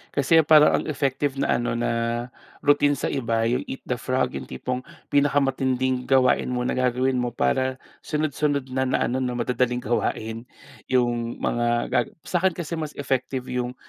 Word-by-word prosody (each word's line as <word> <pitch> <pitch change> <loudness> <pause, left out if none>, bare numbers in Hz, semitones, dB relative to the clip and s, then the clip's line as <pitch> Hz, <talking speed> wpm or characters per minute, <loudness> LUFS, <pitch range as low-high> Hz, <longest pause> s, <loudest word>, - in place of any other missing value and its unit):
kasi 150 +4 +4
parang 155 -1 +6
ang - - -4
effective 140 -1 -1
na 135 - 0
ano 120 - -1
na 120 0 0 0.7
routine 145 0 +4
sa 140 - -2
iba 115 -4 0
'yung, 120 +3 +1
"Eat 135 - -7
the 125 -1 -3
frog" 130 0 0
'yung - - -6
tipong 125 - -3 0.3
pinakamatinding 130 -3 +1
gawain 130 -1 +3
muna 125 0 -1
gagawin 130 0 +1
mo 125 - 0
para 130 +1 +1 0.3
sunod-sunod 145 -3 -1
na 130 0 0
na - - +1
ano 130 +2 -1
na 125 -1 -2
madadaling 125 0 0
gawain. 115 0 -2 0.4
'Yung 120 -2 0
mga 120 0 0 0.2
ga - - +3 0.2
sa 175 - -1
'kin 185 -1 +1
kasi 170 -1 -4
mas 155 -1 -5
effective 130 -1 -2
'yung 125 0 -2
130 Hz, 165 wpm, -24 LUFS, 125-140 Hz, 0.7 s, parang